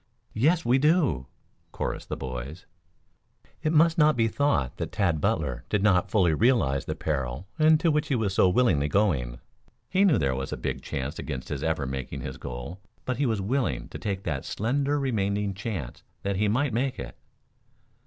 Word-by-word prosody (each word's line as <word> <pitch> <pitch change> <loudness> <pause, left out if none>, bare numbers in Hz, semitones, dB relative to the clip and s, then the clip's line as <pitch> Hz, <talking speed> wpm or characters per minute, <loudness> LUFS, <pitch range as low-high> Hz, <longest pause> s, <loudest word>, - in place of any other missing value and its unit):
"Yes, 155 +9 +2
we 125 +3 +4
do," 145 - +2 0.4
chorused - - -4
the - - -3
boys. 65 +7 -6 1.0
It 155 -1 +1
must 165 +1 +4
not 150 -3 +5
be 115 -1 +3
thought 110 - 0
that - - -4
Tad 95 -6 +1
Butler - - 0
did 105 -1 +1
not 90 -4 +3
fully 90 -7 +3
realize 80 - +2
the 75 - -3
peril 75 -1 -3
into 155 +2 +5
which 150 0 +1
he 140 - +1
was 105 -5 0
so 95 - +4
willingly 90 - +3
going. 75 - +1 0.5
He 190 +1 +4
knew 175 - +5
there 70 -3 +1
was 65 +1 -4
a - - -3
big - - -3
chance 70 +5 -4
against 65 -4 -5
his 70 - -3
ever 80 -3 0
making 65 0 -5
his 65 +1 -6
goal, 60 +9 -7 0.3
but 130 - -1
he 140 - +1
was 110 -4 0
willing 105 - -1
to - - -8
take 100 -2 -3
the 75 -5 -2
slender 140 +6 0
remaining 100 -6 0
chance 95 - -5 0.2
that 100 -1 -1
he 105 +2 +2
might 125 +4 +1
make 130 +3 0
it. 60 -2 -7
100 Hz, 185 wpm, -27 LUFS, -, 1.0 s, not